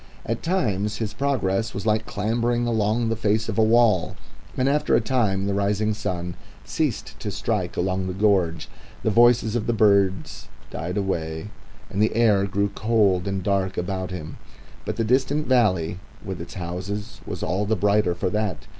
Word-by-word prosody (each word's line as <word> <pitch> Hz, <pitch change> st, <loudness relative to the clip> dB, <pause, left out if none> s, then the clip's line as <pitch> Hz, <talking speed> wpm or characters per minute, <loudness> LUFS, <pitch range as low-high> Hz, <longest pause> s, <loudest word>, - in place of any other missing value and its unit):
At 115 Hz, 0 st, -2 dB
times 105 Hz, -, 0 dB
his 110 Hz, -3 st, -3 dB
progress 115 Hz, -4 st, -1 dB
was 100 Hz, -, -4 dB
like 110 Hz, 0 st, +1 dB
clambering 120 Hz, +3 st, 0 dB
along 115 Hz, 0 st, +1 dB
the 115 Hz, -, 0 dB
face 110 Hz, 0 st, 0 dB
of -, -, -2 dB
a -, -, +6 dB
wall, 110 Hz, -6 st, +3 dB, 0.4 s
and 130 Hz, -, +2 dB
after 145 Hz, +2 st, +2 dB
a -, -, +5 dB
time 105 Hz, -7 st, 0 dB
the 100 Hz, -, 0 dB
rising 105 Hz, +2 st, +1 dB
sun 90 Hz, -4 st, -3 dB, 0.3 s
ceased -, -, -2 dB
to -, -, -4 dB
strike -, -, -2 dB
along 95 Hz, +1 st, 0 dB
the 90 Hz, -, -3 dB
gorge, 95 Hz, -6 st, +1 dB, 0.4 s
the 110 Hz, -, +2 dB
voices 120 Hz, 0 st, +4 dB
of 115 Hz, -, -1 dB
the 120 Hz, -, +2 dB
singing -, -, -4 dB
birds 95 Hz, -2 st, 0 dB, 0.2 s
died 90 Hz, +4 st, -4 dB
away, 80 Hz, -2 st, -2 dB, 0.4 s
and 100 Hz, -, -1 dB
the 110 Hz, -, +2 dB
air 105 Hz, -4 st, +3 dB
grew 100 Hz, +1 st, 0 dB
cold 100 Hz, -5 st, +2 dB
and 95 Hz, -1 st, -2 dB
dark 95 Hz, -1 st, 0 dB
about 95 Hz, +1 st, -2 dB
him. 80 Hz, -4 st, -7 dB, 0.5 s
But -, -, -3 dB
the 115 Hz, -, 0 dB
distant 135 Hz, +6 st, +1 dB
valley 95 Hz, -9 st, +2 dB, 0.3 s
with 95 Hz, -3 st, -5 dB
its 85 Hz, -, -9 dB
houses 95 Hz, +3 st, -5 dB
was -, -, -5 dB
all 95 Hz, +5 st, -1 dB
the 110 Hz, -, +2 dB
brighter 100 Hz, -2 st, +2 dB
for 90 Hz, -, -1 dB
that. 105 Hz, -1 st, -2 dB
105 Hz, 180 wpm, -24 LUFS, 95-115 Hz, 0.5 s, a